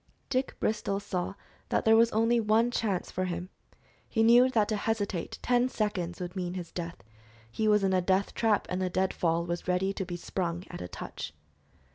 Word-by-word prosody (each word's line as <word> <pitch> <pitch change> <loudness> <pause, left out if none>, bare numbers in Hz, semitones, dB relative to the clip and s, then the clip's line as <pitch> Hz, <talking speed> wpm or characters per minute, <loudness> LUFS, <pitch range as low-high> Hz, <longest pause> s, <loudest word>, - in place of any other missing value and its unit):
Dick 260 0 0
Bristol 200 -2 0
saw 195 -1 -3 0.3
that - - +1
there 220 0 +7
was 230 +1 +6
only 230 +2 +3
one 225 +2 +3
chance 205 -7 -1
for 185 - -1
him. 180 0 -4 0.6
He 225 - +2
knew 240 +3 +7
that 220 -5 +2
to 215 - +1
hesitate 205 -4 -2
ten 245 0 +3
seconds 185 -7 -2
would 180 0 -5
mean 180 -1 -3
his 175 -3 -6
death. 170 - -6 0.5
He 215 - 0
was 210 -1 +4
in 190 -1 +2
a 185 - +3
death 190 +2 +1
trap, 220 -3 +2
and 180 +1 -2
the 185 - 0
dead 190 +1 0
fall 170 0 +1
was 175 +1 -4
ready 185 +2 +1
to 195 - -3
be 175 -1 -5
sprung 175 0 -3
at - - -7
a 90 - -5
touch. - - -7
195 Hz, 200 wpm, -29 LUFS, 180-220 Hz, 0.6 s, there